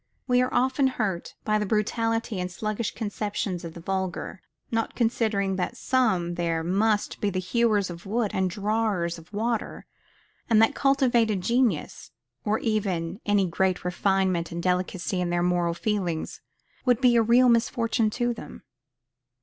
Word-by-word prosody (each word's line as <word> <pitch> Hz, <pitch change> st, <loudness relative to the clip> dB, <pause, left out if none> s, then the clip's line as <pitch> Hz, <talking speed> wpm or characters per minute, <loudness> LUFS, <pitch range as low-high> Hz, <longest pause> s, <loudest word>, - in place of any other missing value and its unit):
We 250 Hz, -1 st, +4 dB
are 255 Hz, -, 0 dB
often 265 Hz, +2 st, +2 dB
hurt 210 Hz, -9 st, -3 dB
by 215 Hz, 0 st, +2 dB
the 210 Hz, -, -1 dB
brutality 225 Hz, 0 st, 0 dB
and 180 Hz, 0 st, -3 dB
sluggish 215 Hz, +4 st, -3 dB
conceptions 205 Hz, -4 st, -3 dB
of 165 Hz, -1 st, -7 dB
the -, -, -8 dB
vulgar; 190 Hz, +1 st, -3 dB, 0.3 s
not 225 Hz, -1 st, -1 dB
considering 220 Hz, -5 st, 0 dB
that 195 Hz, +6 st, -2 dB
some 220 Hz, -11 st, +1 dB
there 165 Hz, -1 st, -1 dB
must 205 Hz, +4 st, 0 dB
be 205 Hz, -, +1 dB
to 200 Hz, -, -1 dB
be 185 Hz, -, 0 dB
hewers 205 Hz, 0 st, +1 dB
of 170 Hz, +3 st, -10 dB
wood 220 Hz, 0 st, 0 dB
and 190 Hz, -1 st, +1 dB
drawers 200 Hz, -3 st, -1 dB
of 165 Hz, -, -17 dB
water, 225 Hz, +2 st, -2 dB, 0.6 s
and 225 Hz, -2 st, +5 dB
that 225 Hz, -, +5 dB
cultivated 240 Hz, -7 st, +2 dB
genius, 235 Hz, -, 0 dB, 0.3 s
or 210 Hz, +1 st, +1 dB
even 195 Hz, -5 st, -2 dB
any 205 Hz, -2 st, +3 dB
great 185 Hz, +1 st, 0 dB
refinement 185 Hz, -2 st, +1 dB
and 170 Hz, 0 st, -4 dB
delicacy 180 Hz, 0 st, -1 dB
in 175 Hz, -, -1 dB
their 175 Hz, 0 st, +1 dB
moral 175 Hz, -1 st, +1 dB
feelings, 180 Hz, -5 st, -2 dB, 0.4 s
would 245 Hz, -3 st, +3 dB
be 250 Hz, -2 st, +4 dB
a 230 Hz, -, +6 dB
real 240 Hz, +3 st, +5 dB
misfortune 230 Hz, -1 st, +2 dB
to 240 Hz, +2 st, -1 dB
them. 230 Hz, -, -10 dB
205 Hz, 160 wpm, -26 LUFS, 180-230 Hz, 0.6 s, a